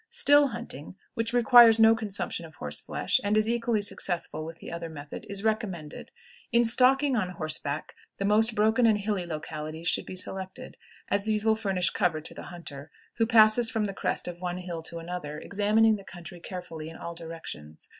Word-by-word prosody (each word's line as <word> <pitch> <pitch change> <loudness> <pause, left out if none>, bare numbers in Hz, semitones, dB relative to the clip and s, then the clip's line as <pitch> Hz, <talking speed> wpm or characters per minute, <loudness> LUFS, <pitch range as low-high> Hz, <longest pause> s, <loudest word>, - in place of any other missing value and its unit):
Still 290 0 +5
hunting, 160 - -7 0.2
which 230 -2 -2
requires 240 -1 +7
no 225 0 +6
consumption 205 -5 -3
of 160 -1 -12
horse 75 0 -4
flesh, - - 0
and 205 +1 +1
is 215 0 +2
equally 230 -2 0
successful 175 -5 -2
with 165 +1 -8
the - - -10
other 170 0 -5
method, 145 -2 -9
is 200 0 -3
recommended. 200 -9 -3 0.4
In 235 0 +4
stalking 265 +4 +4
on 195 -6 0
horseback, 155 -3 -3 0.2
the 195 - -2
most 220 +2 +3
broken 220 +3 +3
and 215 -2 +4
hilly 200 -3 -2
localities 155 +1 -5
should - - +1
be - - -7
selected, 190 0 -5 0.4
as 200 +1 +1
these 215 0 0
will 220 0 +4
furnish 195 -5 0
cover 175 -6 0
to 155 - -11
the - - -9
hunter, 155 -4 -9 0.3
who 225 - +2
passes 225 0 +6
from 220 -2 -1
the 200 - -4
crest - - -2
of 175 0 -7
one 180 -1 -3
hill 175 -2 -6
to 170 +1 -5
another, 165 -3 -6
examining 210 +5 +2
the 195 - -12
country 175 -1 -10
carefully 170 -3 -7
in 165 - -11
all 170 - -6
directions. 160 - -9
190 Hz, 190 wpm, -27 LUFS, 165-220 Hz, 0.4 s, requires